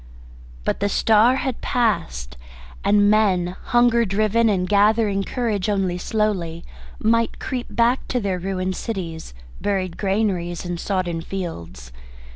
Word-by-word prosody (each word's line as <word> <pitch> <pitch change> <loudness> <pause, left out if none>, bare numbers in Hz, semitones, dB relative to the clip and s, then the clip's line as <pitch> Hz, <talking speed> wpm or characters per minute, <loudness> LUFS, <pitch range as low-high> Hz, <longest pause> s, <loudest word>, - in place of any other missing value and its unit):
But - - -1
the 205 - 0
star 225 +4 +4
had 265 -2 -3
passed, 65 - -1 0.5
and 205 +1 +4
men, 185 -4 +2
hunger 240 -1 +4
driven 215 +2 +2
and 185 -3 0
gathering 205 0 +3
courage 215 -4 -2
only 190 -3 0
slowly, 185 -6 -1 0.3
might 230 +1 +1
creep 250 -2 -4
back 240 +2 +1
to 250 - 0
their 195 -4 -2
ruined 185 0 -2
cities, 165 - -5 0.3
buried 190 -3 -1
granaries, 190 -4 -1
and 175 -1 -4
sodden 180 -4 -2
fields. 85 - -7
200 Hz, 125 wpm, -22 LUFS, 180-220 Hz, 0.5 s, star